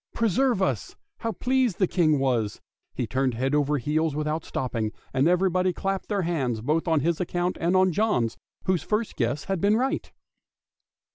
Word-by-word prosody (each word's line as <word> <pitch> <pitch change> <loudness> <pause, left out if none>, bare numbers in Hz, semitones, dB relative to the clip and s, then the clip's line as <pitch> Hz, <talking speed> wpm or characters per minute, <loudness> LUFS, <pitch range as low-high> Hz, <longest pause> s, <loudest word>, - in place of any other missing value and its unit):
Preserve 230 0 +2
us! 125 - -2 0.2
how 230 - -2
pleased 250 -1 +1
the - - +1
old 185 - +1
King 155 -5 +3
was, 120 -7 0 0.4
he - - -1
turned 130 -2 0
head 130 +4 -1
over 150 0 +2
heels 150 +3 0
without 150 +1 -1
stopping, 115 -4 -2 0.2
and 135 +3 +3
everybody 185 +1 +2
clapped 195 +2 -2
their 200 -3 0
hands 135 -9 -1
both 155 +9 0
on 160 -3 +3
his 170 +3 0
account 175 0 -1
and 170 +3 +2
on 185 0 +4
John's, 155 - +1 0.3
whose 185 -4 +1
first 210 +6 -1
guess 120 +4 -1
had 195 -3 -2
been 205 +2 +4
right. 260 +3 -1
165 Hz, 180 wpm, -26 LUFS, 135-190 Hz, 0.4 s, on